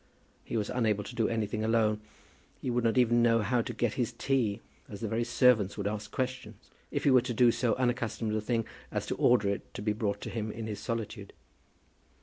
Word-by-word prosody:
He - - -3
was 105 -2 -1
unable 110 -4 +1
to - - -9
do 115 -3 +1
anything 110 -1 -1
alone. 110 -1 +2 0.6
He 125 - -2
would 120 0 0
not 115 +1 +2
even 120 -1 +4
know 115 -1 +4
how 120 +3 +2
to 120 - -4
get 115 -1 -1
his 120 - -1
tea, 120 -7 0 0.3
as 100 - -8
the 115 - -1
very 115 +3 0
servants 120 -5 +3
would 100 - -3
ask 105 0 -3
questions, 125 -5 -4 0.2
if - - -2
he 140 - +4
were 130 -1 +6
to 120 -1 -4
do 120 0 +6
so 120 0 +1
unaccustomed 120 -3 -1
a 110 - 0
thing 115 0 0 0.3
as - - -2
to - - -2
order 120 -5 +4
it 100 - -4
to - - -5
be 105 -1 +1
brought 105 -2 -1
up - - -25
to - - -5
him 110 -2 -3
in 110 +1 -6
his 105 -2 -5
solitude. 115 -3 -5
115 Hz, 225 wpm, -30 LUFS, 105-120 Hz, 0.6 s, were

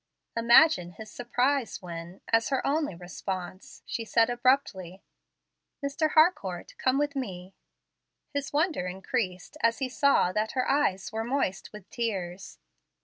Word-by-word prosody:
Imagine 230 - +5
his 215 +5 -10
surprise 245 +1 0
when, 170 0 -8
as 230 0 +3
her 270 -2 0
only 295 - 0
response, 180 +2 -7
she 230 - -3
said 230 +1 +3
abruptly, 240 -8 0 0.8
"Mr. 305 +2 0
Harcourt, 310 - +2
come 260 +1 +2
with 290 0 0
me." 190 -8 -5 0.8
His 285 0 -3
wonder 300 - 0
increased 190 +4 -3
as 230 0 +3
he 265 -2 -2
saw 280 -8 +3
that 215 +3 -1
her 255 -1 0
eyes 195 -10 +1
were 220 +1 -2
moist 240 -6 -2
with 210 -3 -11
tears. 195 -6 -4
230 Hz, 135 wpm, -28 LUFS, 185-275 Hz, 0.8 s, Imagine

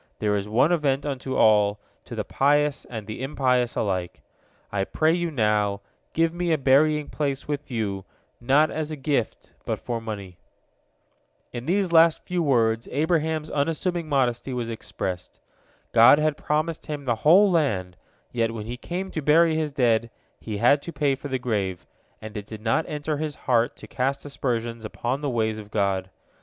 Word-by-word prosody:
There 105 -1 0
is 100 +1 -3
one 125 +9 +3
event 145 -5 +1
unto 135 -2 -3
all, 105 -1 +4 0.3
to - - -8
the - - -2
pious 145 +1 +1
and 110 -4 -7
the 110 +3 -7
impious 125 -3 +1
alike. 90 -4 -2 0.5
I 100 -1 0
pray 155 +10 +1
you 175 -1 -1
now, 105 -6 +1 0.3
give 165 0 +2
me 175 0 -1
a 160 - +3
burying 150 +2 +3
place 140 -2 -3
with 145 0 -4
you, 105 -6 -2 0.4
not 140 +6 +3
as 155 -1 -3
a 155 - -4
gift, 135 -5 -2
but - - -2
for 115 -1 -4
money." 100 -5 -7 1.1
In 120 +1 -6
these 185 0 +1
last 165 -1 +5
few 180 -1 -1
words 115 -6 +2
Abraham's 155 +1 0
unassuming 165 +3 -1
modesty 130 -2 0
was 115 -2 -3
expressed. 95 -5 -5 0.5
God - - +7
had 155 -1 +1
promised 155 +2 -2
him 145 -2 -5
the 120 -3 0
whole 190 +6 +6
land, 100 - 0 0.4
yet 115 -2 0
when 105 -2 -5
he 120 +2 -5
came 185 +7 -5
to 155 - -3
bury 160 +3 +4
his 155 -2 -1
dead, 115 -4 +2 0.3
he 110 -2 -5
had 125 +6 +4
to 170 - -7
pay 145 -4 +1
for 135 +2 -6
the 130 -2 -1
grave, 100 -7 -2 0.3
and 110 -1 -9
it 105 -1 -6
did 110 -1 -9
not 115 +7 +1
enter 150 0 -2
his 150 -1 -3
heart 120 0 +1
to - - -12
cast 135 +3 -2
aspersions 120 -5 -3
upon 120 +5 -3
the 145 - -1
ways 110 -3 -1
of 105 -1 -10
God. 100 -3 0
135 Hz, 175 wpm, -25 LUFS, 110-155 Hz, 1.1 s, God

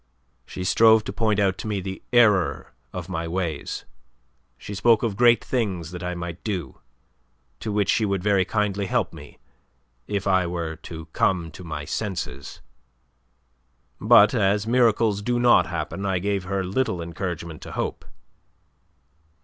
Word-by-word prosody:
"She 90 - -6
strove 110 +3 +5
to - - -6
point 110 -2 +1
out 95 -2 +1
to - - -5
me 105 -2 -1
the 95 0 -6
error 105 -7 +3 0.2
of - - -6
my 80 0 -3
ways. 85 -4 -3 0.7
She 85 +10 -8
spoke 110 +3 +3
of 110 -4 -1
great 120 +2 +4
things 95 - -2
that 90 0 -7
I 90 0 -3
might 85 0 -6
do 90 - -4 0.8
to 110 - -4
which 105 -2 +1
she 115 - +1
would 100 -3 -1
very 100 -2 +3
kindly 100 0 -1
help - - 0
me - - -12 0.7
if 100 -2 -2
I 95 -2 +2
were 85 -2 -3
to 80 -1 -9
come 85 -4 +1
to 90 - -11
my 80 -3 -5
senses. 80 - -5 1.4
But 105 -1 +6
as 105 -2 +2
miracles 115 -3 +2
do 120 +3 0
not 120 0 +5
happen, 85 +3 -4
I 95 -2 0
gave 100 0 -1
her 95 +1 -1
little 95 0 -1
encouragement 85 -1 -5
to - - -9
hope." - - -3
95 Hz, 155 wpm, -24 LUFS, 85-105 Hz, 1.4 s, But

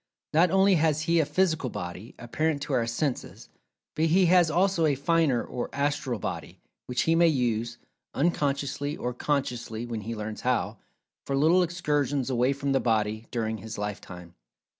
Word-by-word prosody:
Not 170 +4 +5
only 195 +1 +4
has 155 -1 +2
he 165 +1 +2
a 155 - +2
physical 160 -8 +1
body, 90 +4 -7
apparent 145 +5 -1
to 145 - -4
our 120 -3 +1
senses, 125 +3 -3 0.5
but 160 - +2
he 180 +4 +4
has 175 -1 +5
also 175 0 +2
a 145 - +2
finer 145 -3 +2
or 120 - -5
"astral 140 -3 -1
body," - - -6 0.3
which 125 0 0
he 165 - +2
may 170 +1 +5
use 120 -5 0 0.4
(unconsciously, 145 -1 -1
or 125 - -3
consciously, 120 -4 -2
when 115 -2 -4
he 115 +3 -5
learns 105 0 -5
how) 120 -4 0 0.5
for 140 - 0
little 165 +6 +4
excursions 145 -6 0
away 125 +1 +2
from 140 0 -2
the 135 - +3
body, 110 -2 0
during 110 -2 -2
his 110 0 -7
lifetime. 90 -4 -6
140 Hz, 165 wpm, -27 LUFS, 115-160 Hz, 0.5 s, Not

